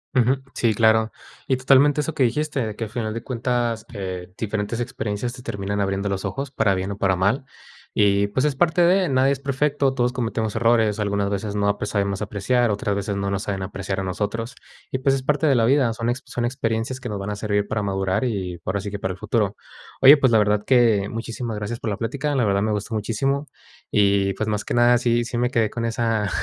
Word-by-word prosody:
Ujú. 130 +2 +3 0.2
Sí, 115 -2 +2
claro. 110 +1 +3 0.4
Y 130 - +2
totalmente 135 +3 +4
eso 160 +2 -3
que 140 -4 +1
dijiste, 135 +1 0
de 110 -1 -5
que, 115 - -3
a - - -9
final 110 -1 -3
de 115 - -5
cuentas, 120 -2 -1
eh, 90 -2 -6
diferentes 110 +1 -2
experiencias 115 0 -3
te 125 -1 -11
terminan 100 -2 -3
abriendo 100 +1 -1
los 95 -1 -3
ojos, 140 -1 -3
para 110 -6 +1
bien 95 +2 -3
o 100 - -5
para 95 -2 +2
mal, 100 +9 +1 0.5
y, 100 0 +4
pues, 130 +8 0
es 145 -2 +1
parte 175 +3 +2
de, 180 0 +3
nadie 135 +1 +3
es 140 - -1
perfecto, 140 0 0
todos 125 -1 +1
cometemos 115 -3 -2
errores, 110 -2 +2
algunas 100 -1 0
veces 100 +1 -3
no, 100 0 +1
pues, - - -3
sabemos 100 -1 -1
apreciar, 110 +4 +1
otras 100 0 -1
veces 100 0 -2
no 100 0 -2
nos 100 +1 -2
saben 95 -2 -3
apreciar 95 0 -4
a - - -2
nosotros 105 +5 -3 0.4
y, 130 - -1
pues, 135 0 +2
es 130 - -4
parte 150 +2 +1
de 135 - +4
la 115 - +3
vida, 130 -1 +3
son 115 +1 -2
ex 125 +3 -2
son 120 -1 -3
experiencias 120 0 -2
que 125 -3 -6
nos 105 - -3
van 100 +2 -4
a - - -3
servir 105 -1 -1
para 110 0 -1
madurar 95 +2 -1
y, 95 -7 -3
ahora 95 +1 -1
sí 100 - -5
que 100 - -5
para 95 -1 -2
el - - -11
futuro. - - 0 0.5
Oye, 135 +2 +10
pues, 130 -4 +3
la 110 - +5
verdad 105 0 +2
que 115 -6 +3
muchísimas 115 0 -4
gracias 105 +3 -4
por 115 - -3
la 100 - -2
plática. 140 +5 -2
La 125 -4 +2
verdad, 100 0 +2
me 110 0 0
gustó 105 +2 -3
muchísimo. 135 +7 -1 0.4
Y, 100 -1 +2
pues, 110 - -2
más 105 -1 -1
que - - -4
nada, 120 0 +5
sí 120 -1 +1
sí 120 - -4
me 125 0 +1
quedé 115 -4 +1
con 115 - -4
esa 115 -2 0
110 Hz, 235 wpm, -23 LUFS, 100-125 Hz, 0.5 s, Oye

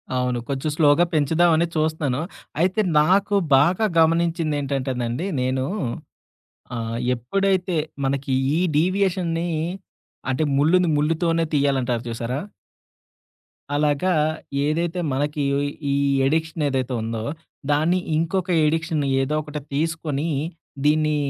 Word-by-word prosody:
అవును. 125 -1 0
కొంచెం 140 +2 -1
స్లోగా 155 +2 +4
పెంచుదామని 160 +2 +3
చూస్తున్నాను. 155 -4 0 0.4
అయితే, 185 +4 +2 0.2
నాకు 195 +6 +3 0.2
బాగా 180 +10 +3
గమనించిందేంటంటేనండి 145 -5 0 0.2
నేను 130 +1 0 1.1
ఆహ్, 115 0 -3 0.2
ఎప్పుడైతే 185 - 0 0.3
మనకి 135 0 -1 0.2
ఈ - - +2 0.2
డీవియేషన్ని 175 0 +1 0.8
అంటే, 130 +4 +1
ముళ్ళుని 170 +5 +3
ముళ్లుతోనే 165 +2 +1
తీయాలంటారు 130 -5 +1
చూసారా? 120 +3 -3 1.4
అలాగా 150 +5 +2 0.5
ఏదైతే 170 +3 -1
మనకి 145 +2 -1 0.5
ఈ - - +1 0.3
అడిక్షన్ 160 +2 0
ఏదైతే 130 -1 -1
ఉందో, 110 0 -3 0.5
దాన్ని 160 +5 +2 0.2
ఇంకొక 180 +3 -1 0.2
అడిక్షన్ 160 -1 0 0.2
ఏదో 145 +3 -1
ఒకటి 150 -1 -6
తీసుకొని, 155 0 -1 0.6
దీన్ని 155 0 +3
155 Hz, 95 wpm, -23 LUFS, 135-170 Hz, 1.4 s, స్లోగా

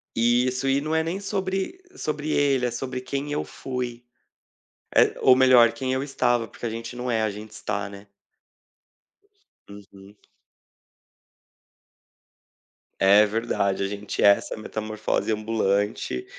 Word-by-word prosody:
Isso. 125 +3 +2
E 135 +1 +3
não 155 +2 -3
é 160 - +2
nem 170 +4 -3
sobre 195 - -3 0.2
sobre 155 - -3
ele, 140 -4 +2
é 120 - -3
sobre 125 +1 -4
quem 140 +3 -4
eu 145 - -1
fui. 125 -2 -5 0.9
Eh, - - +5
ou 130 - +7
melhor, 125 -3 +6
quem 130 +2 -3
eu 130 +1 0
estava, 120 -4 0
porque - - -7
a - - -2
gente 115 +2 -6
não 125 0 -3
é, 110 -1 +1
a 110 - 0
gente 105 +2 -9
está, 105 -2 -4
né? 100 0 -12 1.6
Uhum. 100 0 -14 2.8
É, 100 +2 +6
verdade. 100 -3 -1
A 100 - 0
gente 105 +1 -4
é - - +8
essa 100 - +3
metamorfose 110 0 -3
ambulante. 105 - -1
120 Hz, 135 wpm, -24 LUFS, 105-135 Hz, 2.8 s, é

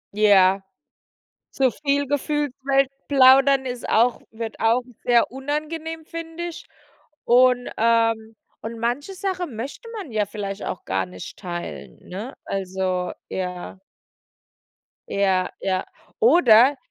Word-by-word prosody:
Ja. 195 -2 +5 0.9
Zu 265 -1 +2
viel 285 -1 0
gefühlt, 290 0 -1
weil 275 0 +3 0.2
plaudern 270 0 +6
ist 250 -1 -5
auch 235 +2 +3
wird 225 0 -6
auch 230 +2 +3 0.2
sehr 240 -1 +4
unangenehm, 310 +4 -4
finde 330 +1 -6
ich. 345 -1 -9 0.6
Und, 250 0 +4
ähm 225 -1 +2 0.3
und 225 +1 -6
manche 245 +10 -2
Sache 375 -1 -2
möchte 275 - -7
man 370 - -7
ja 210 -1 +1
vielleicht 200 0 -6
auch - - -5
gar 95 0 -1
nicht 90 0 -10
teilen, 175 -3 -7
ne? 210 +9 -6
Also, 185 -1 -2 0.2
ja. 180 0 -5 1.3
Ja, 190 -2 +1
ja. 190 -1 -1 0.3
Oder 275 - +6
240 Hz, 115 wpm, -23 LUFS, 200-285 Hz, 1.3 s, plaudern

